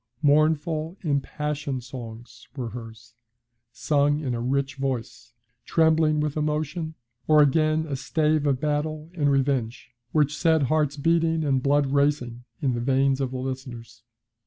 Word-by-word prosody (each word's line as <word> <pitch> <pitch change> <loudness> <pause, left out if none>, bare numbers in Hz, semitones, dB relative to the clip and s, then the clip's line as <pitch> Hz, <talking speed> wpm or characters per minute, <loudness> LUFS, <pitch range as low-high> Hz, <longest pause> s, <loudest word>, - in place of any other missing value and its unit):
Mournful, 155 +3 +2
impassioned 145 -2 -2
songs 120 -1 -10
were 125 -4 -4
hers, 115 0 -10 0.6
sung 145 +1 +1
in 135 -5 -3
a 115 - -3
rich 135 +3 -1
voice, 125 -2 -4 0.3
trembling 160 -1 +3
with 150 -1 -1
emotion, 155 +1 -2 0.3
or 155 -1 +6
again 155 +2 +2
a 145 -3 -3
stave 150 +2 0
of 135 -2 +1
battle 155 +2 -2
and 150 -5 +1
revenge, 135 -4 -1 0.2
which 150 -1 +2
set 160 -1 +2
hearts 150 +1 +1
beating 165 +1 +1
and 135 -3 +1
blood 145 +1 +2
racing 140 -4 0 0.2
in 130 -3 +2
the 120 - -2
veins 135 +1 +2
of 135 - -1
the 130 - -5
listeners. 130 -3 -7
145 Hz, 140 wpm, -25 LUFS, 130-155 Hz, 0.6 s, or